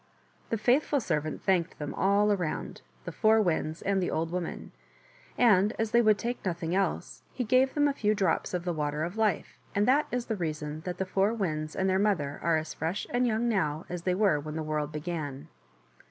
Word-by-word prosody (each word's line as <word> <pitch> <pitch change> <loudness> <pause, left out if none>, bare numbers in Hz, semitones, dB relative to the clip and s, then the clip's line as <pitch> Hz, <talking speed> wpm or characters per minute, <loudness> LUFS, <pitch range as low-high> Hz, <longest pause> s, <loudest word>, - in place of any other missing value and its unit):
The 225 - 0
faithful 265 +6 +2
servant 155 - -2
thanked 180 -3 +1
them 150 -1 -5
all 200 +2 +3
around 180 -6 -2
— - - -32
the - - -4
Four 220 0 +4
Winds 160 -5 -1
and 195 -1 +1
the 180 - 0
old 165 +1 -1
woman 180 -2 -4 0.3
— - - -28 0.2
and 210 -3 +4
as 225 -1 -1
they 235 - +5
would 215 -2 +4
take 240 +2 -4
nothing 170 -2 -2
else, 195 +1 -1
he 250 - -3
gave 255 +3 +3
them 290 -1 +4
a 285 - +1
few 215 -5 +1
drops 190 -2 0
of 175 0 -3
the 175 - 0
Water 150 -1 -2
of 175 +4 -4
Life, 215 -6 -1 0.2
and 205 +1 +2
that 280 +4 +4
is 245 -1 -1
the 225 - -2
reason 155 -4 -4
that 180 -1 -4
the 190 - -1
Four 195 +4 +1
Winds 155 -7 -2
and 190 - 0
their 190 0 +2
mother 170 -9 0
are 165 -1 +2
as 155 0 -4
fresh 165 +5 -3
and 245 +1 +2
young 225 +1 0
now 160 -8 0
as 180 -1 -4
they 180 +1 0
were 190 -7 +3
when 155 +1 -6
the 160 - -2
world 150 -1 -2
began. 150 -3 -5
185 Hz, 220 wpm, -29 LUFS, 160-215 Hz, 0.3 s, they